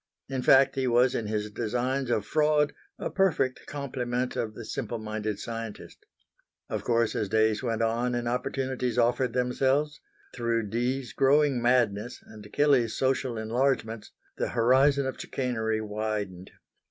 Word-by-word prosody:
In 130 -1 -3
fact 135 +1 +5
he 135 -1 -1
was 125 +1 +4
in 110 - -2
his 105 0 -2
designs 125 +4 -1
of 105 -4 0
fraud 150 +2 +2 0.2
a - - -4
perfect 175 -9 +1
complement 130 -3 -3
of 110 -2 -3
the - - -8
simple 120 -2 -4
minded 110 -1 -3
scientist. 115 0 -7 0.6
Of - - -3
course 115 -2 +1
as 105 -3 -1
days 110 0 +2
went 115 -3 -1
on 120 +2 0
and 120 0 -2
opportunities 125 0 -2
offered 120 0 +2
themselves, 135 +4 +1 0.3
through 115 -3 -1
Dee's 125 +3 -2
growing 140 -1 +3
madness 120 -1 +1
and 105 -1 -13
Kelley's 135 -6 +3
social 130 -2 0
enlargements, 115 -1 -1 0.3
the - - -1
horizon 135 +4 +3
of 130 - -4
chicanery 110 -4 -2
widened. 105 -3 -4
120 Hz, 140 wpm, -28 LUFS, 110-130 Hz, 0.6 s, fact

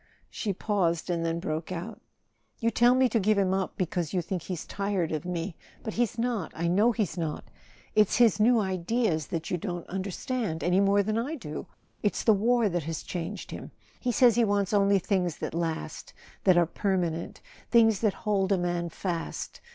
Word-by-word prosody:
She 210 - -2
paused, 180 -4 0
and 170 -1 -1
then 165 0 -1
broke 160 +1 -3
out: 175 -1 -6 0.6
"You 230 -1 +1
tell 240 +3 +5
me 260 0 +4
to 230 - +2
give 210 +1 +2
him 190 -2 +2
up 190 -1 -2
because 175 -2 -2
you 180 - +1
think 180 +1 -3
he's 175 -1 -5
tired 195 -4 -1
of 155 +2 -3
me. 175 0 -3 0.3
But 220 - -4
he's 240 -1 0
not—I 220 -8 -1
know 205 +7 +4
he's 210 -6 -2
not! 155 -3 -3 0.5
It's 215 -2 +4
his 225 -3 +4
new 230 +2 +5
ideas 190 -3 0
that 165 -3 -4
you 180 - +1
don't 175 -2 -4
understand, 195 0 -3
any 180 +2 +3
more 200 0 +4
than 215 +2 0
I 280 +7 -2
do. 155 - -7 0.3
It's 205 - 0
the 220 - +6
war 230 +3 +3
that 175 -5 -2
has 165 0 -4
changed 180 +3 -5
him. - - -7 0.3
He 250 - 0
says 240 0 +5
he 235 - +3
wants 200 -2 +1
only 200 -1 +4
things 180 -4 0
that - - -4
last—that 170 +2 -2
are 175 - +5
per¬ 190 +3 -1
manent—things 190 +6 0
that 215 -4 +2
hold 200 -2 +1
a 195 - +4
man 175 -1 -1
fast. 170 0 -4
195 Hz, 190 wpm, -28 LUFS, 170-215 Hz, 0.6 s, the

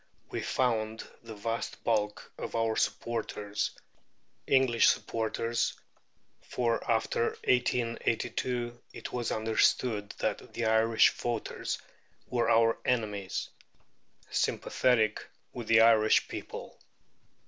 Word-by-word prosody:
We - - -2
found 110 -3 -1
the 115 -2 -9
vast 115 +3 -4
bulk 105 -2 -1
of - - -6
our 115 -1 +1
supporters 105 -4 -2 0.8
English 130 -4 +4
supporters, 115 +1 0 0.7
for 120 -2 -1
after 115 +1 +1
1882 120 0 0
it - - -8
was 120 -1 -2
understood 110 -1 +1
that - - -3
the 115 - -1
Irish 110 0 +4
voters 120 -2 -3 0.5
were 120 -2 0
our 115 0 +4
enemies 105 -6 -1 0.8
sympathetic 110 -4 +1 0.3
with 120 -3 -6
the 115 0 +6
Irish 110 -1 +5
people. - - -8
115 Hz, 95 wpm, -30 LUFS, 110-120 Hz, 0.8 s, the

